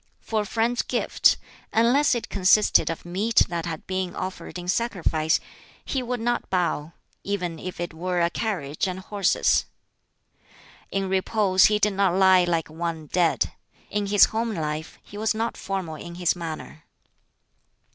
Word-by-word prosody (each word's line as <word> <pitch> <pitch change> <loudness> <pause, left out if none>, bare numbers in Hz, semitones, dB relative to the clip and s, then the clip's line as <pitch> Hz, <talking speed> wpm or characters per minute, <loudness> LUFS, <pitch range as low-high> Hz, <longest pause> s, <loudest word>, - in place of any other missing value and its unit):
For 220 -1 -1
a - - -4
friend's 235 +3 +1
gift - - +2 0.3
unless 245 +5 +3
it 235 - -3
consisted 195 +2 +4
of 165 - -5
meat 200 +6 +2
that 170 0 -3
had 160 -2 -5
been 185 -1 -3
offered 185 0 -5
in 175 0 -7
sacrifice 180 -7 +1 0.5
he 265 - -1
would 250 0 -3
not 240 +1 -1
bow, 170 -4 -1 0.3
even 180 -5 -3
if 185 -1 -7
it 175 -1 -4
were 180 +2 -2
a 170 0 +2
carriage 180 -7 -2
and 185 0 -3
horses. 200 0 +1 1.2
In 195 -1 -1
repose 190 0 +3
he 210 - +4
did 210 -1 +2
not 190 -2 +2
lie 190 -1 +5
like 165 -2 0
one 160 0 -4
dead. 175 -2 +2 0.4
In 205 -1 -1
his 205 0 +7
home 225 0 -1
life 155 -1 -4
he 205 - -10
was 220 0 +1
not 225 +2 -2
formal 190 -5 -4
in 170 +2 -8
his 175 -1 +1
manner. 160 -2 -7
185 Hz, 155 wpm, -25 LUFS, 170-210 Hz, 1.2 s, his